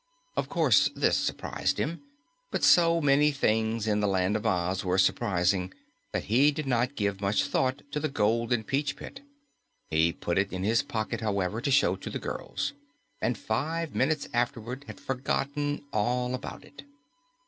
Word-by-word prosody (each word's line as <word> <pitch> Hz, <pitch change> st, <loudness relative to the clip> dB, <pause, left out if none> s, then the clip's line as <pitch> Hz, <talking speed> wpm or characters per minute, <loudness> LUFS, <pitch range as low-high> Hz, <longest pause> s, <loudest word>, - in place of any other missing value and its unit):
Of -, -, -1 dB
course, -, -, +4 dB
this -, -, +2 dB
surprised -, -, -1 dB
him, 165 Hz, +3 st, -2 dB, 0.5 s
but -, -, -2 dB
so 170 Hz, -1 st, +5 dB
many 145 Hz, +1 st, +4 dB
things 110 Hz, -4 st, 0 dB
in 105 Hz, -1 st, +1 dB
the 105 Hz, -, +1 dB
Land 95 Hz, +1 st, +1 dB
of 110 Hz, -, -1 dB
Oz 90 Hz, +1 st, 0 dB
were 90 Hz, 0 st, 0 dB
surprising 95 Hz, -1 st, +2 dB, 0.4 s
that -, -, -2 dB
he 130 Hz, +8 st, +4 dB
did 150 Hz, +1 st, -4 dB
not 125 Hz, +1 st, 0 dB
give 100 Hz, -3 st, -1 dB
much 100 Hz, +1 st, +2 dB
thought 130 Hz, -1 st, 0 dB
to 150 Hz, -, -1 dB
the 155 Hz, +1 st, -1 dB
golden 115 Hz, -1 st, +1 dB
peach 145 Hz, +4 st, -1 dB
pit. 270 Hz, -, -10 dB, 0.7 s
He 80 Hz, +1 st, +3 dB
put 85 Hz, +2 st, -1 dB
it 100 Hz, 0 st, 0 dB
in 95 Hz, 0 st, -3 dB
his 115 Hz, +3 st, +3 dB
pocket, 110 Hz, -1 st, -3 dB
however, 105 Hz, 0 st, -1 dB
to -, -, -1 dB
show 135 Hz, -9 st, +4 dB
to -, -, -7 dB
the -, -, -3 dB
girls, 140 Hz, 0 st, -4 dB, 0.5 s
and 120 Hz, -, 0 dB
five 160 Hz, +10 st, -2 dB
minutes 150 Hz, +2 st, +1 dB
afterward 120 Hz, +2 st, -2 dB
had -, -, -9 dB
forgotten 140 Hz, +2 st, -2 dB
all 125 Hz, +4 st, 0 dB
about 130 Hz, +1 st, -6 dB
it. 145 Hz, 0 st, -13 dB
115 Hz, 170 wpm, -28 LUFS, 100-140 Hz, 0.7 s, so